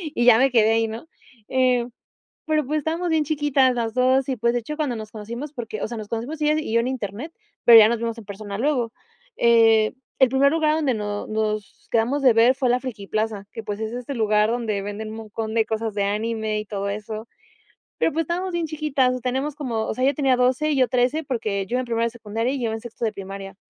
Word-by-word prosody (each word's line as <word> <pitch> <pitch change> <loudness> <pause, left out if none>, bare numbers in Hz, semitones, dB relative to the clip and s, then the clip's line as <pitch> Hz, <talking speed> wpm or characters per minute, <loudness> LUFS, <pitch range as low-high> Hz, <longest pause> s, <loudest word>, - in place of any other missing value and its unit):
y 240 - +1
ya 240 -2 +8
me 270 0 +4
quedé 225 -2 +4
ahí, 225 0 +2
¿no? 225 +8 -7 0.4
Eh, 250 -2 +2 0.6
pero, 310 -3 +1
pues, 305 +3 0
estábamos 330 +4 -2
bien 315 -1 +2
chiquitas 290 -4 +2
las 230 -2 -2
dos 255 +1 +3
y, 260 - -1
pues, 235 +1 +1
de - - +2
hecho, 300 +7 -6
cuando 285 -7 -1
nos 215 -1 -8
conocimos, 235 +7 -7
porque, 225 -5 -6
o - - -2
sea, 235 - -6
nos 210 - -7
conocimos 245 +8 -4
ella 300 0 +3
y 305 - -5
yo 230 - +4
en 240 - -1
Internet, 250 - -5 0.3
pero 230 -1 +10
ya 215 - +8
nos 235 0 0
vimos 230 0 -3
en 225 - -9
persona 200 0 -7
luego. 245 -3 0 0.4
Eh, 225 -2 +4 0.3
el 260 - +7
primer 275 +2 +3
lugar 310 -1 +2
donde 290 -5 +1
no 205 -1 -4
nos 215 -1 -3
quedamos 240 +5 +1
de 255 -3 +6
ver 235 +3 +5
fue 260 -2 0
la 250 +1 +2
Frikiplaza, 215 -3 -3
que, 225 - -6
pues, 205 0 -4
es 220 0 -3
este 250 +3 -5
lugar 215 -1 +2
donde 225 -4 -1
venden 205 +2 -5
un 220 - -7
montón 220 0 -5
de 225 -1 +3
cosas 220 0 -3
de 205 - 0
anime 215 +1 -1
y 210 - -8
todo 200 -1 -3
eso, 215 +2 -6 0.7
pero, 325 - +2
pues, 325 +1 0
estábamos 360 +3 -2
bien 340 -1 -1
chiquitas, 280 -5 0
teníamos 265 +3 -1
como 230 -6 -2
o - - -2
sea, 255 - -1
ella 275 - +4
tenía 270 -4 +2
12 255 +5 +2
y - - 0
yo 255 -2 +3
13, 255 +5 +1
porque 215 -7 -2
yo 240 - -2
iba 255 - +1
en 255 - -5
primero 230 -1 0
de 235 - 0
secundaria 225 +2 -3
y - - -2
ella 220 - -2
en 225 - -5
sexto 235 0 -6
de 220 - 0
primaria. 195 0 -8
235 Hz, 240 wpm, -23 LUFS, 220-265 Hz, 0.7 s, pero